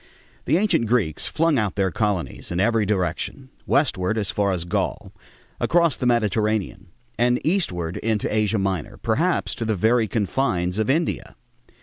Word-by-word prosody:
The 155 - +3
ancient 195 - +1
Greeks 105 -10 +1
flung 160 -4 +2
out 105 -4 -1
their 95 -2 +1
colonies 105 -4 -2
in 85 - -2
every 110 0 +2
direction, 100 - -2 0.2
westward 110 -8 +1
as 105 -3 -1
far 100 -1 +1
as 85 -2 -2
Gaul, 85 - -2 0.5
across 170 -3 +3
the 125 - -2
Mediterranean, 110 -4 0 0.3
and 120 +1 +3
eastward 90 - -1
into 110 -2 -1
Asia 110 0 +1
Minor, 95 -5 -2
perhaps - - 0
to - - -4
the 110 -1 0
very 110 +4 +2
confines 100 -3 -1
of 110 - 0
India. 160 +5 -1
110 Hz, 150 wpm, -23 LUFS, 95-125 Hz, 0.5 s, The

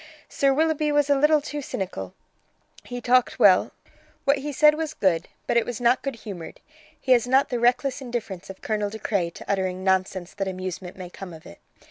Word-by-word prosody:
Sir 275 -1 +2
Willoughby 305 +1 +1
was 290 -1 +2
a - - +6
little 300 +2 +4
too 295 0 -5
cynical; 140 - -5 0.7
he 245 0 -6
talked 250 0 +3
well; - - +5 0.5
what 280 0 +3
he 295 +2 -4
said 300 +2 +5
was 310 0 -4
good, 175 -3 +1 0.2
but - - +1
it 235 - +4
was 245 -3 -5
not 245 +1 +3
good 275 -2 -3
humoured; 200 -7 -9 0.4
he 260 - -2
has 245 -1 +5
not 265 +2 +3
the 245 - -1
reckless 255 +3 +1
indifference 230 -8 -5
of 195 - -10
Colonel 210 -2 -1
De 220 - -7
Craye 195 -5 -1
to - - -12
uttering 185 -1 -1
nonsense 190 -1 0
that 195 -1 -3
amusement 185 -1 -5
may 180 -2 -8
come 185 -2 -9
of 160 0 -13
it. 85 - -13
235 Hz, 200 wpm, -25 LUFS, 190-275 Hz, 0.7 s, a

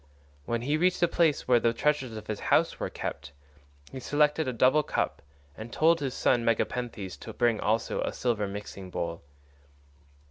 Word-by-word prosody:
When 115 +5 -2
he 145 +4 +1
reached 180 +3 +2
the 175 - +4
place 165 -3 +1
where 125 -1 +5
the 115 0 +2
treasures 130 -3 0
of 110 - -8
his 105 -1 -4
house - - +3
were - - -2
kept, 70 - -6 0.6
he 130 - -6
selected 150 +3 +1
a - - 0
double 130 +5 +4
cup, - - -2 0.3
and 110 +2 -8
told 165 +4 +3
his 135 -2 -3
son 120 - +2
Megapenthes 115 -4 -1
to - - -8
bring 120 -3 +2
also 110 +2 0
a - - -1
silver 110 -5 -1
mixing 100 -1 -7
bowl. 85 -1 -4
120 Hz, 175 wpm, -28 LUFS, 110-150 Hz, 0.6 s, where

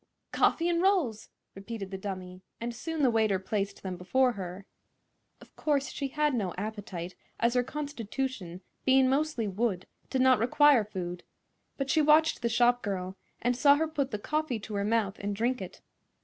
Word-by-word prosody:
"Coffee 335 - +2
'n' 340 -1 +1
rolls!" 350 - +1 0.2
repeated 195 0 -7
the 190 - -4
dummy, 185 -2 -6 0.2
and 235 +1 -4
soon 315 +5 -3
the 255 - +5
waiter 220 -3 +2
placed 200 +1 -3
them 185 -2 -4
before 255 +8 +2
her. 190 -2 -7 0.7
Of - - -18
course 280 -3 0
she 280 - -3
had 300 +1 0
no 200 -7 -2
appetite, 200 -4 -5 0.3
as 235 +1 +2
her 250 - +3
constitution, 260 - -4 0.2
being 265 0 +5
mostly 270 -4 0
wood, 195 -2 -1 0.2
did 260 -1 +1
not 260 -3 +5
require 260 +1 +5
food; 180 -4 -5 0.6
but 275 -1 -1
she 315 - +4
watched 305 0 +4
the 235 - +1
shop 245 +1 +3
girl, 190 -2 -3 0.3
and 245 +1 +2
saw 280 +3 +6
her 320 +2 0
put 290 -4 -2
the 210 - -3
coffee 300 +1 -2
to 215 - -8
her 200 -1 0
mouth 215 -2 0
and 200 0 -3
drink 240 +4 0
it. - - -8
235 Hz, 175 wpm, -29 LUFS, 200-275 Hz, 0.7 s, saw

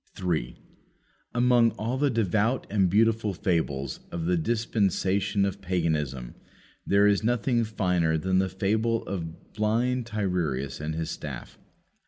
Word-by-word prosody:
3. 80 -10 -2 0.8
Among 120 -1 +5
all 115 +4 -2
the 145 +2 +2
devout 115 +1 +1
and 95 -3 +3
beautiful 110 0 +2
fables 75 -6 -1
of 85 -1 -3
the 90 +1 +2
"dispensation 100 0 +1
of 100 0 -3
paganism," 80 -9 -1 0.5
there 100 +1 +4
is 105 0 +3
nothing 120 +1 +1
finer 90 -7 +1
than 95 +3 +1
the 95 0 +1
fable 110 +5 0
of 85 -4 -6
blind 115 +3 0
Tiresias 85 - -2
and 80 +1 -3
his 80 -1 -3
staff. - - -7
100 Hz, 130 wpm, -27 LUFS, 85-110 Hz, 0.8 s, Among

